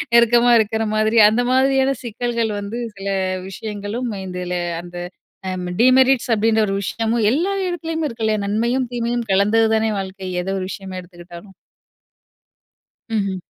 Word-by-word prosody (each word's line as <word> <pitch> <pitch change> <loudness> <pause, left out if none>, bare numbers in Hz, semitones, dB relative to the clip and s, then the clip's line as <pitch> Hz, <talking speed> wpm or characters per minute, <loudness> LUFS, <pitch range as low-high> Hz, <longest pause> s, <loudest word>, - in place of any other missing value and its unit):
நெருக்கமா 240 +1 +5
இருக்கிற 220 +1 0
மாதிரி 215 +1 +3
அந்த 240 +3 +1
மாதிரியான 270 +1 +3
சிக்கல்கள் 235 -1 -2
வந்து 205 +4 -5 0.2
சில 195 0 -6 0.4
விஷயங்களும் 215 +4 -5
இதுல, 180 -1 -5 0.3
அந்த 175 0 -10 0.8
டீமெரிட்ஸ் 255 0 +4
அப்டின்ற 220 +1 +2
ஒரு 195 - -1
விஷயமும் 225 +3 -1
எல்லா 340 +9 0 0.2
இடத்துலயுமே 325 -2 -3
இருக்குல்லயா? 220 -3 -1
நன்மையும் 235 +5 0
தீமையும் 240 0 -2
கலந்தது 215 +3 +3
தானே 220 0 +1
வாழ்க்கை. 190 -1 -6
எத - - -10
ஒரு 185 - -3
விஷயமா 190 -2 -7
எடுத்துக்கிட்டாலும். 175 +2 -13 1.6
ம்ஹ்ம். 195 -3 0
220 Hz, 125 wpm, -20 LUFS, 200-240 Hz, 1.6 s, நெருக்கமா